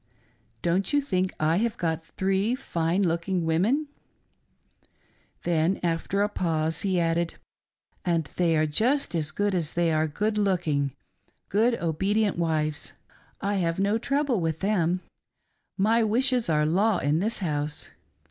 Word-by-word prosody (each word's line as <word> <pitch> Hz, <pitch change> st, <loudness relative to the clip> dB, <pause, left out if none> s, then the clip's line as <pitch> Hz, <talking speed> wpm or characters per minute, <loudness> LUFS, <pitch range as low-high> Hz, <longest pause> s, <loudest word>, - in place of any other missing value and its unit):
Don't 185 Hz, +8 st, +1 dB
you 290 Hz, -, +5 dB
think 185 Hz, -9 st, 0 dB
I 155 Hz, +2 st, +2 dB
have 230 Hz, +2 st, 0 dB
got 165 Hz, -2 st, -1 dB
three 195 Hz, +7 st, 0 dB
fine 175 Hz, -7 st, -1 dB
looking 170 Hz, +1 st, 0 dB
women 200 Hz, -, +2 dB, 0.7 s
.'" -, -, -39 dB
Then, 170 Hz, +2 st, +1 dB
after 175 Hz, +4 st, 0 dB
a -, -, +2 dB
pause, 165 Hz, -5 st, -1 dB
he 190 Hz, -3 st, +1 dB
added: 165 Hz, 0 st, 0 dB, 0.4 s
" -, -, -68 dB, 0.3 s
And 170 Hz, -3 st, +1 dB
they 170 Hz, -3 st, +2 dB
are 155 Hz, -, +3 dB
just 240 Hz, -, +1 dB
as 155 Hz, -3 st, -1 dB
good 205 Hz, +4 st, 0 dB
as 165 Hz, -4 st, -1 dB
they 170 Hz, -1 st, +2 dB
are 155 Hz, 0 st, +2 dB
good 210 Hz, +7 st, -1 dB
looking 155 Hz, -9 st, 0 dB, 0.2 s
— -, -, -43 dB
good, 230 Hz, +4 st, +3 dB
obedient 195 Hz, +5 st, 0 dB
wives. 155 Hz, -2 st, -1 dB, 0.5 s
I 200 Hz, 0 st, 0 dB
have 170 Hz, -3 st, 0 dB
no 200 Hz, +3 st, +1 dB
trouble 275 Hz, -4 st, 0 dB
with 160 Hz, -1 st, -2 dB
them: 185 Hz, -3 st, +1 dB, 0.8 s
my 225 Hz, +4 st, +3 dB
wishes 245 Hz, 0 st, +2 dB
are 150 Hz, -1 st, +3 dB
law 195 Hz, +7 st, +2 dB
in 145 Hz, +3 st, +1 dB
this 220 Hz, +5 st, 0 dB
house. 150 Hz, -4 st, -3 dB
180 Hz, 150 wpm, -26 LUFS, 160-210 Hz, 0.8 s, you